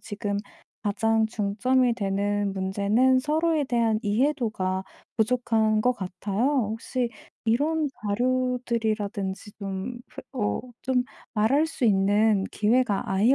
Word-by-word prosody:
지금 205 Hz, -1 st, -3 dB, 0.5 s
가장 220 Hz, +2 st, +2 dB
중점이 235 Hz, +4 st, +1 dB
되는 205 Hz, -1 st, 0 dB
문제는 200 Hz, +7 st, +2 dB
서로에 310 Hz, +2 st, +1 dB
대한 230 Hz, -3 st, +1 dB
이해도가 210 Hz, -5 st, 0 dB, 0.3 s
부족한 220 Hz, -2 st, +2 dB
거 250 Hz, +2 st, +3 dB
같아요. 195 Hz, +3 st, -2 dB, 0.3 s
혹시 240 Hz, +2 st, -2 dB, 0.3 s
이런 295 Hz, +7 st, +1 dB, 0.2 s
자료들이라든지 220 Hz, -4 st, -1 dB
좀 200 Hz, +4 st, -4 dB
그 -, -, -10 dB
어 220 Hz, -6 st, -1 dB, 0.2 s
좀 255 Hz, -1 st, +1 dB, 0.3 s
말할 265 Hz, +9 st, +3 dB
수 295 Hz, -5 st, -3 dB
있는 205 Hz, 0 st, +3 dB
기회가 215 Hz, -1 st, +2 dB
아예 210 Hz, +8 st, +4 dB
220 Hz, 240 characters per minute, -26 LUFS, 205-250 Hz, 0.5 s, 아예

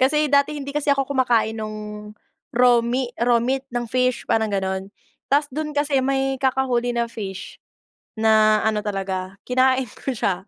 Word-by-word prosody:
kasi 300 Hz, +4 st, +3 dB
dati 285 Hz, +1 st, +3 dB
hindi 280 Hz, 0 st, -6 dB
kasi 295 Hz, 0 st, -2 dB
ako 275 Hz, -1 st, +2 dB
kumakain 240 Hz, -5 st, +1 dB
nung 210 Hz, -1 st, -7 dB, 0.4 s
raw 245 Hz, -1 st, +5 dB
me 245 Hz, +1 st, -1 dB
raw 240 Hz, 0 st, +4 dB
meat 265 Hz, +2 st, 0 dB
ng 240 Hz, -1 st, -2 dB
fish 255 Hz, -1 st, +1 dB
parang 220 Hz, -1 st, +2 dB
gano'n. 190 Hz, 0 st, -2 dB, 0.4 s
Ta's 290 Hz, +1 st, +3 dB
dun 305 Hz, 0 st, -3 dB
kasi 290 Hz, -2 st, +2 dB
may 270 Hz, 0 st, 0 dB
kakahuli 255 Hz, -2 st, +1 dB
na 235 Hz, 0 st, 0 dB
fish 195 Hz, -5 st, -7 dB, 0.6 s
na 215 Hz, -1 st, +4 dB
ano 215 Hz, -1 st, +1 dB
talaga 190 Hz, -2 st, -3 dB
kinain 260 Hz, +1 st, +2 dB
ko 270 Hz, -, -6 dB
siya, 190 Hz, -3 st, -1 dB
240 Hz, 160 wpm, -22 LUFS, 215-270 Hz, 0.6 s, raw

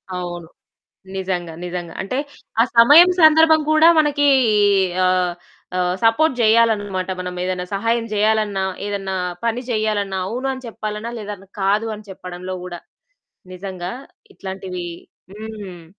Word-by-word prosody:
అవును. 175 Hz, -2 st, -6 dB, 0.7 s
నిజంగా, 180 Hz, -3 st, -3 dB
నిజంగా. 175 Hz, -2 st, -5 dB
అంటే 225 Hz, +7 st, -3 dB, 0.4 s
ఆ -, -, +6 dB
సమయం 295 Hz, +10 st, +8 dB
సందర్భం 315 Hz, 0 st, +6 dB
కూడా 310 Hz, +1 st, +6 dB
మనకి 290 Hz, -1 st, +2 dB, 0.8 s
ఆహ్, 180 Hz, -1 st, +1 dB, 0.4 s
ఆహ్, 180 Hz, 0 st, 0 dB
సపోర్ట్ 250 Hz, +4 st, +3 dB
జేయాలనమాట. 215 Hz, -4 st, +2 dB
మనం 180 Hz, 0 st, -4 dB
ఏదైనా 180 Hz, -1 st, -2 dB
సహాయం 230 Hz, +3 st, 0 dB
జేయాలన్నా, 210 Hz, -2 st, +1 dB, 0.2 s
ఏదన్నా 195 Hz, -2 st, -3 dB, 0.3 s
పని 235 Hz, +2 st, -1 dB
జేయాలన్నా, 205 Hz, -3 st, -1 dB
అవును 255 Hz, +5 st, -3 dB
అని 260 Hz, -1 st, -9 dB
చెప్పాలన్నా, 215 Hz, +1 st, -5 dB
లేదన్నా 200 Hz, -2 st, -8 dB
కాదు 205 Hz, +4 st, +1 dB
అని 210 Hz, -1 st, -14 dB
చెప్పడంలో 185 Hz, 0 st, -7 dB
కూడా, 175 Hz, -1 st, -7 dB, 0.8 s
నిజంగా 185 Hz, 0 st, -6 dB, 0.4 s
ఇట్లాంటివి 190 Hz, -2 st, -6 dB, 0.5 s
హ్మ్. 205 Hz, -6 st, -9 dB
205 Hz, 115 wpm, -20 LUFS, 185-230 Hz, 0.8 s, సమయం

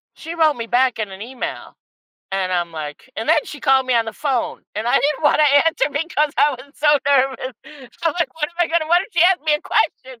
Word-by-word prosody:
She 330 Hz, +1 st, -8 dB
wrote 315 Hz, -3 st, +3 dB
me 230 Hz, -3 st, -6 dB
back 250 Hz, +1 st, +1 dB
in 215 Hz, -2 st, -3 dB
an 190 Hz, +1 st, -9 dB
email, 250 Hz, +2 st, -6 dB, 0.6 s
and 190 Hz, -1 st, -1 dB
I'm, 175 Hz, -2 st, -1 dB
like 155 Hz, -, -8 dB
And 225 Hz, -, -4 dB
then 320 Hz, -, +5 dB
she 290 Hz, -, -9 dB
called 265 Hz, -1 st, +3 dB
me 255 Hz, -, +1 dB
on 230 Hz, -, +3 dB
the 220 Hz, -, -5 dB
phone, 260 Hz, 0 st, -2 dB
and 215 Hz, +2 st, -3 dB
I 240 Hz, -, +2 dB
didn't 300 Hz, +2 st, +1 dB
wanna 300 Hz, +1 st, +4 dB, 0.2 s
answer 320 Hz, -4 st, +2 dB
because 300 Hz, 0 st, -1 dB
I 295 Hz, -, +5 dB
was 260 Hz, +2 st, -10 dB
so 300 Hz, -, 0 dB, 0.2 s
nervous. 265 Hz, -2 st, +1 dB, 0.5 s
I'm 330 Hz, -2 st, +1 dB
like, 340 Hz, -, -1 dB
"What 305 Hz, -2 st, -2 dB
am -, -, -26 dB
I 345 Hz, -, +4 dB
gonna 330 Hz, -1 st, 0 dB
what 350 Hz, +2 st, +4 dB
if -, -, -11 dB
she 340 Hz, -3 st, +3 dB
ask 365 Hz, +1 st, +4 dB
me 305 Hz, -1 st, +3 dB
a 300 Hz, -, -2 dB
question?" 260 Hz, -5 st, -1 dB
270 Hz, 240 wpm, -20 LUFS, 235-315 Hz, 0.6 s, then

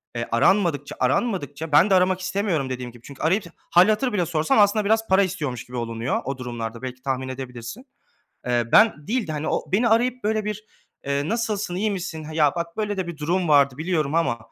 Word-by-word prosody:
eee, 115 Hz, 0 st, -3 dB
aranmadıkça, 145 Hz, -, +2 dB
aranmadıkça 155 Hz, -, -1 dB
ben 155 Hz, +7 st, +5 dB
de 195 Hz, -, +5 dB
aramak 185 Hz, 0 st, +3 dB
istemiyorum 185 Hz, -6 st, -1 dB
dediğim 125 Hz, -1 st, -5 dB
gibi 120 Hz, 0 st, -17 dB
çünkü 140 Hz, +1 st, -11 dB
arayıp 190 Hz, +7 st, +2 dB, 0.3 s
hâl 175 Hz, +2 st, +6 dB
hatır 225 Hz, +3 st, +1 dB
bile 180 Hz, -4 st, +1 dB
sorsam, 160 Hz, +4 st, +1 dB
aslında, 205 Hz, +1 st, +4 dB
biraz 225 Hz, +2 st, +2 dB
para 190 Hz, +1 st, +4 dB
istiyormuş 150 Hz, -, -4 dB
gibi 125 Hz, 0 st, -8 dB
olunuyor 115 Hz, +1 st, -2 dB
o 135 Hz, 0 st, -3 dB
durumlarda. 120 Hz, -2 st, -6 dB
Belki 130 Hz, -1 st, -7 dB
tahmin 130 Hz, 0 st, -2 dB
edebilirsin. 130 Hz, -, -7 dB, 0.6 s
Eee, 120 Hz, -1 st, +1 dB
ben 180 Hz, -9 st, +5 dB
değil 235 Hz, -1 st, -1 dB
de, 155 Hz, -, -4 dB
hani, 150 Hz, 0 st, -3 dB
o, -, -, -1 dB
beni 230 Hz, +5 st, +3 dB
arayıp, 245 Hz, +1 st, +1 dB
böyle, 215 Hz, 0 st, 0 dB
bir, 210 Hz, 0 st, -4 dB, 0.4 s
eee, 140 Hz, +2 st, -1 dB
"Nasılsın, 215 Hz, -4 st, -2 dB
iyi 210 Hz, +3 st, 0 dB
misin? 175 Hz, -5 st, -5 dB
Ha, 155 Hz, -, -8 dB
ya, 150 Hz, -3 st, +3 dB
bak 170 Hz, 0 st, -4 dB
böyle 210 Hz, -1 st, -2 dB
de 190 Hz, -2 st, -2 dB
bir 170 Hz, -1 st, -6 dB
durum 170 Hz, +4 st, 0 dB
vardı 140 Hz, -3 st, +4 dB
biliyorum 155 Hz, -3 st, -1 dB
ama, 165 Hz, -8 st, +1 dB
165 Hz, 205 wpm, -23 LUFS, 135-200 Hz, 0.6 s, hâl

